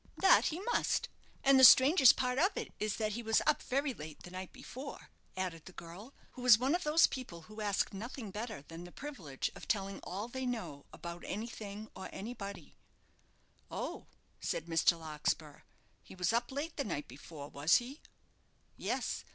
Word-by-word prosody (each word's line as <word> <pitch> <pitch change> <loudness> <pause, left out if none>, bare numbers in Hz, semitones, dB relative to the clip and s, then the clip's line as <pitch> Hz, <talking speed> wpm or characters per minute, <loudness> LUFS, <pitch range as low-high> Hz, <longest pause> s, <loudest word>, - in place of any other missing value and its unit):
"That 380 -1 +6
he 325 - -1
must; 480 +4 0 0.3
and 275 -1 +6
the - - +6
strangest 265 +1 +9
part 250 +1 0
of 375 +6 +2
it - - -4
is 215 -1 -1
that 215 -1 -1
he 235 +3 -3
was 225 -1 +3
up - - +3
very 275 +1 0
late 155 -5 -10
the 175 - -10
night 185 0 -6
before," 270 +3 -9 0.3
added 175 -4 -3
the 185 - -11
girl, 185 +12 -10 0.2
who 255 - -10
was 245 -3 +8
one 260 +5 +1
of 355 - 0
those 305 +2 +6
people 175 -11 -5
who 215 +5 -9
ask 205 -1 0
nothing 225 +1 -6
better 215 - -5
than 165 +3 -9
the 175 - -10
privilege 185 - -5
of - - -11
telling 195 -2 -1
all 200 +5 -5
they 260 +1 -4
know 220 -13 -4
about 170 0 -8
anything 215 -1 -5
or 190 - -7
anybody. 200 -5 -7 1.0
"Oh," - - -5 0.3
said 160 - -2
Mr. 165 0 +3
Larkspur; 155 -1 -3 0.4
"he - - -13
was 180 +3 +1
up 240 +2 0
late 295 +4 -4
the 280 - 0
night 155 - -4
before, 145 +3 -10
was 145 +4 +3
he?" 260 +5 -1 0.8
"Yes. - - -2
215 Hz, 180 wpm, -34 LUFS, 170-255 Hz, 1.0 s, strangest